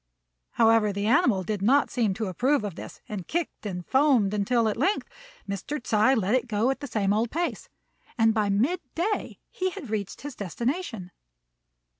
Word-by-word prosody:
However, 225 -2 +4
the 200 +1 -3
animal 225 -5 +3
did 205 +1 -3
not 270 +8 +3
seem 220 -6 +1
to 220 +2 -2
approve 245 - +1
of 205 -3 -4
this, - - -10
and 205 -6 -6
kicked 335 -9 -3
and 180 -3 -5
foamed 260 -8 +3
until 220 +3 +2
at 215 - 0
length 375 - 0 0.4
Mr. 200 +10 -4
Ts'ui 235 +1 +3
let 210 -2 0
it 255 -1 +1
go 225 +3 +1
at 270 - -4
the 285 - -6
same 205 -4 +1
old 220 +2 +1
pace; 340 +6 -3 0.5
and 225 -1 +4
by 215 -2 +1
mid 250 - +1 0.2
day 405 +6 -2
he 375 0 -1
had 275 -10 -8
reached 205 -3 -3
his 290 -2 -7
destination. 230 - -3
225 Hz, 180 wpm, -26 LUFS, 205-270 Hz, 0.5 s, However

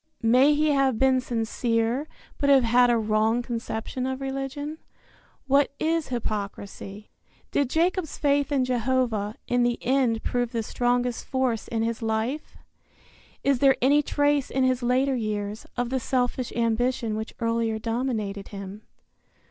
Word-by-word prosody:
May 255 +6 +5
he 305 +1 +2
have 275 -4 +2
been 260 +1 +3
sincere, 230 +3 -1 0.3
but 280 - +2
have 270 -2 +6
had 245 +1 +4
a 240 - +3
wrong 220 +2 +1
conception 235 +2 -4
of 260 0 -3
religion? 275 +3 -4 0.7
What 275 +1 +3
is 325 0 0
hypocrisy? 205 -3 -5 0.4
Did 280 -3 +1
Jacob's 340 +2 0
faith 285 0 +1
in 270 -3 +2
Jehovah, 240 -4 0
in 245 0 +2
the 240 0 +2
end 245 -3 +1
prove 245 -1 -1
the 230 -1 -1
strongest 245 +1 0
force 260 -5 -1
in 225 -1 -1
his 230 0 -2
life? 225 +6 -2 0.9
Is 275 -2 +2
there 270 0 +5
any 285 +4 +4
trace 290 -1 +1
in 265 - 0
his 255 -1 +2
later 255 +3 +2
years, 210 -2 -3
of 245 0 -1
the 265 - +1
selfish 250 0 -1
ambition 230 -1 0
which 220 +1 -5
earlier 230 -1 0
dominated 220 -3 -2
him? 200 +1 -8
245 Hz, 145 wpm, -25 LUFS, 225-270 Hz, 0.9 s, have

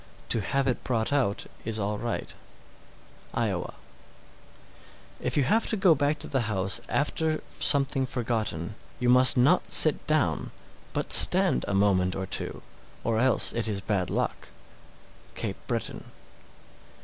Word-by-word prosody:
To 115 - +1
have 135 +5 -2
it 125 - -3
brought 115 +1 -2
out 125 -8 -1 0.2
is 110 0 -4
all 105 0 -4
right. 120 -1 -5 1.0
Iowa. - - -3 1.4
661. - - -6
If - - -3
you 145 - +2
have 220 - 0
to 220 - -2
go 190 -3 +4
back 145 +1 -1
to 150 - -6
the 135 -2 -2
house 95 -1 0
after 155 +2 -2 0.2
something 135 -2 +2
forgotten, 110 -8 -4 0.3
you 125 -1 -1
must 125 +1 +6
not 125 +2 +1
sit - - +5
down, - - -1 0.4
but - - -1
stand 60 - +8
a 100 - -2
moment 95 -2 0
or 95 - -5
two, - - -5 0.4
or 115 -1 -1
else 130 0 +1
it 115 -1 -3
is 105 -2 -3
bad 100 -3 -3
luck. - - -4 0.9
_Cape - - -5
Breton. - - -5
120 Hz, 145 wpm, -25 LUFS, 100-140 Hz, 1.4 s, stand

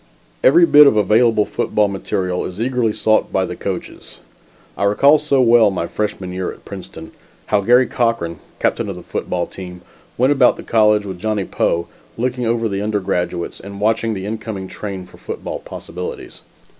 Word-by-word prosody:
Every 350 -9 +7
bit 150 - +8
of 110 - +3
available 110 +1 +3
football 105 -1 0
material 95 -2 -2
is 90 +2 -7
eagerly 120 -1 0
sought 110 +1 +1
by - - +1
the - - -6
coaches. - - -6 0.6
I - - -3
recall 140 +9 +5
so 140 -3 +2
well 115 -2 +5
my 90 -3 -2
freshman 100 -2 -4
year 95 0 -3
at - - -15
Princeton, 80 - -9 0.3
how 105 -1 +1
Garry 125 +5 +5
Cochran, 115 -10 -1 0.2
captain - - -1
of - - -5
the - - -10
football - - -3
team, 90 -1 -9 0.4
went 130 +3 +3
about 135 -3 +4
the - - -9
college 105 -2 +3
with 95 -3 -6
Johnny 105 0 -1
Poe, 85 -1 -1 0.3
looking 125 0 -1
over 115 0 +1
the 100 -1 -3
undergraduates 95 -4 -2
and 100 0 -9
watching 110 +1 +1
the 95 0 -5
incoming 105 -2 -5
trains 95 -2 -7
for - - -17
football - - -6
possibilities. 90 - -8
105 Hz, 170 wpm, -19 LUFS, 95-115 Hz, 0.6 s, bit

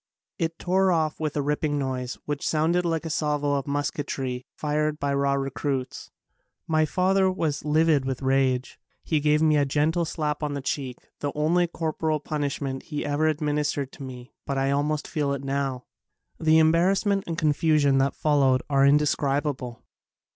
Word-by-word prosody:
It 165 -1 -1
tore 190 +1 +2
off 160 -3 0
with 155 -1 -2
a 145 - +1
ripping 150 +1 0
noise 130 -2 -3
which 145 -1 -3
sounded 165 +3 +1
like 165 -1 -1
a - - -3
salvo 150 -1 0
of 140 -1 -1
musketry 140 -3 -3
fired 150 0 -1
by 140 0 0
raw 140 0 +1
recruits. 135 -1 -3 0.6
My 155 -1 +2
father 190 +2 +2
was 155 -5 -2
livid 155 -1 +3
with 130 0 -4
rage. 130 -1 +1 0.2
He 155 - +1
gave 150 +1 +2
me 155 -1 +4
a 145 - +3
gentle 155 +5 +1
slap 150 -2 -2
on 150 -1 -2
the - - -2
cheek, 130 -2 -3 0.2
the 145 - -2
only 170 +4 +2
cor 165 -2 -3
poral 155 -2 -1
punishment 140 -3 -3
he 150 -2 -3
ever 145 +2 +1
administered 150 -3 -1
to - - -14
me 125 -1 -9
but 140 - -1
I 135 0 +1
almost 150 +2 0
feel 145 -3 -1
it 140 -1 -4
now. 135 -2 -2 0.5
The 160 0 +4
embar 165 +3 +4
rassment 195 0 +1
and 165 -1 -3
confusion 150 -3 +3
that 135 +1 +1
followed 135 -4 +2
are 135 -1 +4
indescribable. 140 -3 +1
150 Hz, 170 wpm, -25 LUFS, 140-155 Hz, 0.6 s, me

